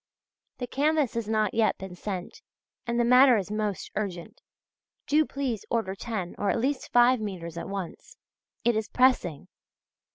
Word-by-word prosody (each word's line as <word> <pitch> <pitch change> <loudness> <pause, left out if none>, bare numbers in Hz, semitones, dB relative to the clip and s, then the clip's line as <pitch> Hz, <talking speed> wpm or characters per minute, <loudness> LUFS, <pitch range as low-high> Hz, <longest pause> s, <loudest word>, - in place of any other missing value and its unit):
The 250 - -3
canvas 290 +1 +1
has 230 -2 -3
not 215 -2 +1
yet 225 -1 +2
been 190 -1 -8
sent, 185 0 -6 0.5
and 235 0 0
the 240 - +3
matter 250 0 +7
is 200 0 -3
most 210 -2 -3
urgent. 185 -5 -5 0.6
Do 305 +1 +3
please 260 -6 -3
order 225 -5 -1
ten 195 -3 -4
or 205 - 0
at - - +1
least 260 +3 -2
five 245 +1 +5
metres 175 -6 -5
at 170 - -6
once. 195 -4 -7 0.5
It 240 -1 +3
is 220 0 -2
pressing. 250 - +2
220 Hz, 160 wpm, -27 LUFS, 195-250 Hz, 0.6 s, matter